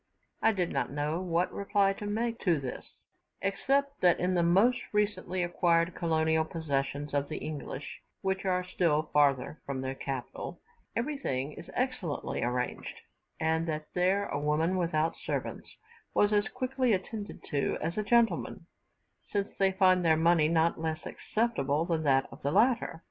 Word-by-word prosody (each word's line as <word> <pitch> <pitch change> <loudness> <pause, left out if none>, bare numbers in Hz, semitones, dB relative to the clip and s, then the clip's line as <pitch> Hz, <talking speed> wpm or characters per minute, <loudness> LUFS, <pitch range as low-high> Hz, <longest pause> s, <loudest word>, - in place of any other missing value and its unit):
I - - +5
did 180 -5 -1
not - - -1
know 150 +4 -1
what 175 -1 0
reply 200 0 +2
to 205 +1 -6
make 230 +2 -1
to 170 -6 +2
this, 130 -2 -5 0.6
except 275 +8 0
that 175 -2 +4
in 180 +1 +1
the 175 - +3
most 195 +9 +4
recently 195 -3 0
acquired 170 0 +2
colonial 160 -1 +1
possessions 145 -2 -3
of 145 0 0
the 155 - -4
English, 145 -2 -6 0.2
which 190 0 0
are 180 -1 +1
still 165 -4 0
farther 140 0 +2
from 135 -1 -4
the 130 0 -3
capital, 135 -2 -5 0.4
everything 230 - -2
is - - -11
excellently 245 - -2
arranged; 125 +1 -3 0.4
and 160 +1 +1
that 155 -1 -4
there 190 +3 +2
a 145 - -2
woman 155 +5 +1
without 165 -3 +1
servants - - -4 0.5
was 205 +1 +4
as 205 0 +3
quickly 255 -1 0
attended 205 +2 -4
to 140 -1 0
as 165 +2 -2
a 215 - 0
gentleman, 225 -4 +2 0.7
since 200 -1 -2
they 195 -1 +4
find 185 -1 +4
her 160 -2 +4
money 165 -1 +4
not 165 0 +2
less 160 0 -3
acceptable 165 - 0
than 165 -2 0
that 135 -3 +3
of - - -12
the 140 - 0
latter. 220 - +2
170 Hz, 160 wpm, -30 LUFS, 155-200 Hz, 0.7 s, I